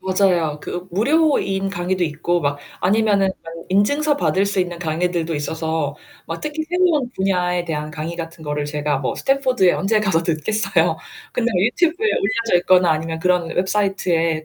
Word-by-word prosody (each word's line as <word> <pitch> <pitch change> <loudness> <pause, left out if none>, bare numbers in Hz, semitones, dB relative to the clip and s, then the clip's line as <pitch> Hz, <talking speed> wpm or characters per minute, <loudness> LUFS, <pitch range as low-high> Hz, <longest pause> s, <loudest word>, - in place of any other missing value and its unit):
맞아요. 185 -5 +1
그 180 +4 -6
무료인 210 - +1
강의도 180 0 -2
있고 170 +2 0
막 145 -2 -1 0.2
아니면은 200 0 +3 0.2
뭐 165 0 -9
인증서 285 +10 +2
받을 195 -8 +1
수 200 -1 -2
있는 175 -2 -1
강의들도 170 0 -1
있어서 160 -1 -2 0.3
막 - - -5
특히 305 +1 -3
새로운 345 -7 +2
분야에 180 -2 0
대한 150 -2 -4
강의 160 +3 -5
같은 165 -1 -7
거를 150 -1 -2
제가 145 -1 -1
뭐 135 - -2
스탠포드에 260 -9 +2
언제 215 +2 +1
가서 190 -6 +1
듣겠어요. 170 +7 +1 0.4
근데 240 -1 0
유튜브에 345 - +1
올려져 225 - +1
있거나 180 0 +4
아니면 160 +1 -2
그런 180 -1 +1
웹사이트에 180 -5 0
180 Hz, 365 characters per minute, -20 LUFS, 160-210 Hz, 0.4 s, 있거나